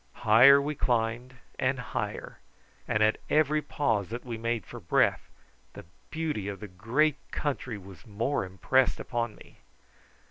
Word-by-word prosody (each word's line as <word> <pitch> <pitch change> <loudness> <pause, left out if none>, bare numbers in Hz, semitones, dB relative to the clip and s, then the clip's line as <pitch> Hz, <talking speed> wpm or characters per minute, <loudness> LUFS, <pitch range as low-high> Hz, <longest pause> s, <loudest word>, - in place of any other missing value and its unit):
Higher 125 +6 +8
we 145 +2 -2
climbed 120 -1 -1 0.2
and 130 +1 +1
higher, 125 -2 -5 0.5
and 110 - +2
at 110 0 +2
every 155 0 +3
pause 115 -11 -1
that 120 +3 -6
we 120 -2 -4
made 115 -3 -2
for - - -9
breath - - +1 0.4
the - - -11 0.2
beauty 155 -11 -3
of 100 -1 -5
the 105 - -7
great 120 +11 +1
country 130 -6 -3
was 95 -3 -13
more 115 +7 -1
impressed 95 +8 +1
upon 120 -3 -3
me. - - -17
120 Hz, 145 wpm, -28 LUFS, 105-140 Hz, 0.5 s, Higher